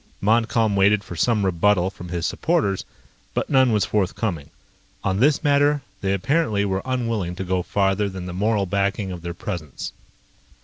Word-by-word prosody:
Montcalm 110 0 +2
waited 100 +1 +4
for 90 - -8
some 105 +4 +2
rebuttal 95 +1 +2
from 90 -2 -10
his 85 -2 -2
supporters, 100 -2 0 0.5
but - - -1
none 130 -2 +5
was 105 -2 +2
forthcoming. 95 - -1 0.5
On 95 +1 0
this 145 +6 +3
matter, 145 -1 +3 0.2
they 95 - 0
apparently 105 - +1
were 95 -1 -1
unwilling 115 -8 -1
to 95 - -4
go 90 0 0
farther 100 +2 +1
than 95 -2 -7
the 90 - -6
moral 105 +2 +1
backing 100 +1 -1
of 90 -2 -7
their 85 0 -5
presence. 85 -8 -6
100 Hz, 165 wpm, -23 LUFS, 95-115 Hz, 0.5 s, none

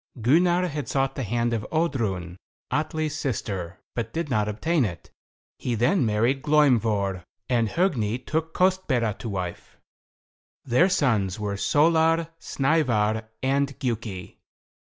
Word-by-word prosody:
Gunnar 175 +9 +3
had 145 -4 -4
sought 135 +1 0
the 135 - -4
hand 120 +1 0
of 110 -2 -1
Oddrun, 110 - -1 0.3
Atli's 155 0 -1
sister, 100 - -3 0.2
but 115 - -3
did 160 -3 -3
not 105 -4 +1
obtain 145 +9 +1
it. 90 -7 -5 0.5
He 120 - -1
then 125 - +2
married 115 +6 +1
Glaumvor, 115 - +2 0.2
and 115 -3 +1
Hogni 125 - 0
took 160 +5 -3
Kostbera 180 - +2
to 115 - -5
wife. 90 -3 -5 0.9
Their 140 +9 +4
sons 110 - +1
were 105 -1 -2
Solar, 160 +7 +3
Snævar, 115 -7 +1 0.2
and 140 +1 +1
Giuki. 110 -7 -4
125 Hz, 125 wpm, -25 LUFS, 105-155 Hz, 0.9 s, Their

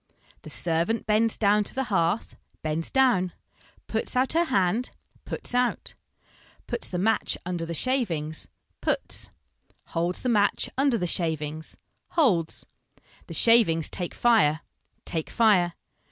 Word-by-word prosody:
The - - -11
servant 170 +7 0
bends 220 +1 +2
down 210 0 +3
to - - -7
the 265 - 0
hearth, 195 -3 0 0.3
bends 155 +1 -1
doivn. 240 -10 +2 0.5
Puts 220 +2 -2
out 255 +3 +3
her 335 +1 +3
hand, 220 - +1 0.4
puts - - -4
out. 250 0 0 0.7
Puts - - -1
the 180 - -3
match 220 +5 +1
under 175 -2 -3
the 170 - -3
shavings, 165 - -1 0.3
puts. - - -1 0.6
Holds 170 +2 -1
the - - -1
match 205 -3 +1
under 270 -2 +2
the 180 - -1
shavings, 160 -2 -2 0.4
holds. 185 - +2 0.6
The - - -5
shavings 215 -9 +4
take 175 -2 -4
fire, 200 -11 +3 0.4
take 160 -2 -3
fire. 195 -7 +3
195 Hz, 130 wpm, -26 LUFS, 165-235 Hz, 0.7 s, shavings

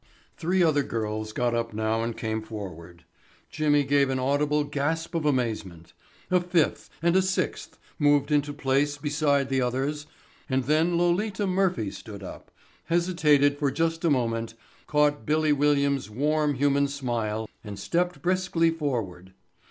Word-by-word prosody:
Three 180 +2 +1
other 155 -3 +3
girls 110 -3 -3
got 120 +2 0
up 115 -2 -2
now 110 +1 0
and 115 0 -3
came 110 -1 -2
forward. 90 -6 -9 0.5
Jimmy 145 -2 +2
gave 140 0 +2
an 130 - 0
audible 145 +3 +1
gasp 145 +3 -2
of 165 -2 -1
amazement. 105 - -2 0.4
A 180 - +5
fifth 175 -3 0
and 170 +1 +3
a 190 - +5
sixth 190 0 -2 0.2
moved 145 0 +3
into 145 0 +2
place 145 +1 0
beside 145 -2 +1
the 135 -1 +1
others 135 +4 -2 0.4
and 130 -1 +1
then 160 +5 +2
Lolita 190 +4 +1
Murphy 185 - 0
stood 100 -3 -10
up, - - -10 0.4
hesitated 150 -5 +2
for 145 -2 +2
just 165 +4 -1
a 170 - +3
moment, 115 -4 -1 0.3
caught 150 -1 +2
"Billy" 155 0 +2
Williams' 140 -3 +1
warm 150 +5 0
human 140 +1 +2
smile 115 -6 -3 0.2
and 105 -3 -7
stepped 175 - -1
briskly 180 -2 +2
forward. 115 - -4
145 Hz, 145 wpm, -26 LUFS, 115-155 Hz, 0.5 s, A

